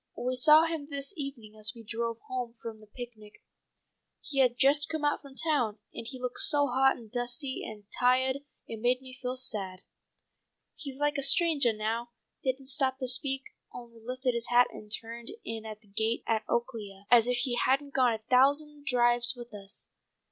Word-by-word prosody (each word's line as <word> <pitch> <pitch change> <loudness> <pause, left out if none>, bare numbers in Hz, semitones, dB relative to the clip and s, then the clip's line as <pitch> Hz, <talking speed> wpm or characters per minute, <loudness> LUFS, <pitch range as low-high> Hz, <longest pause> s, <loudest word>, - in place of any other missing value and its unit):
We 250 +1 -1
saw 305 +5 +6
him 325 -3 -4
this 280 +3 -3
evening 270 -8 -6
as 215 0 -1
we 230 - -11
drove 230 +1 -4
home 245 -2 -5
from 225 -2 -8
the 215 - -12
picnic. 215 -2 -11 0.8
He 275 -2 -3
had 250 -2 +3
just 280 +2 +3
come 315 -2 -2
out 290 - +1
from 275 -2 -14
town, 270 -9 +1 0.2
and 230 - -7
he 260 -1 -7
looked 250 -1 -3
so 290 -2 +5
hot 265 0 +3
and 225 -3 -14
dusty 245 +2 -1
and 210 -2 -8
ti'ahed 260 +2 +2 0.3
it 225 - -7
made 250 +2 +2
me 260 -1 -10
feel 255 -1 -4 0.2
bad. 190 -3 -5 0.9
He's 275 -2 -7
like 295 0 +1
a - - -1
strangah 280 -4 +5
now, 225 +3 -3 0.3
didn't 265 0 -1
stop 265 -1 +3
to 260 -1 -4
speak, 265 +2 +2 0.3
only 235 -2 -11
lifted 255 +1 -2
his 235 0 -2
hat 245 0 +5
and 210 0 -12
turned 230 +2 -5 0.2
in 225 -1 -5
at 215 -1 -8
the 215 - -24
gate 220 +3 -1
at 220 -1 -1
Oaklea, 215 -5 -3
as 240 -1 +7
if 250 0 +2
he 245 0 +1
hadn't 275 +3 +1
gone 260 -2 +4
on - - -1
a 220 - -11
thousand 285 +3 +2
drives 240 -1 +3
with 240 -2 -11
us. 200 0 -4
245 Hz, 190 wpm, -29 LUFS, 230-270 Hz, 0.9 s, as